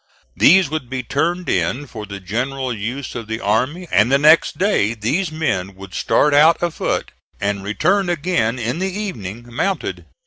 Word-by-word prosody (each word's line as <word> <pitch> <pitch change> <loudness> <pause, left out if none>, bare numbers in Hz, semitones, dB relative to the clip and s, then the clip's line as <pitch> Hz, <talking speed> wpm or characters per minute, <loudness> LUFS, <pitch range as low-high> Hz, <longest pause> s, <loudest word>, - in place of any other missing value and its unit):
These 185 +2 +6
would 155 -6 -4
be 130 -1 -3
turned 170 +5 -1
in 145 +4 0
for 110 -5 -8
the 100 0 -7
general 125 +7 -3
use 120 +6 -5
of 115 -3 -6
the 110 +1 -3
army, 130 - 0
and 105 +5 +3
the 140 - +5
next 155 +3 +4
day 180 - +1
these 145 - -1
men 100 - -2
would 95 -1 -11
start 150 - +2
out 155 +3 +6
afoot 175 -2 -2 0.3
and 100 -1 -2
return 175 - +1
again 145 -9 0
in 120 +6 -2
the 190 +1 -1
evening 120 - -5
mounted. 195 +10 -2
130 Hz, 170 wpm, -19 LUFS, 110-170 Hz, 0.3 s, These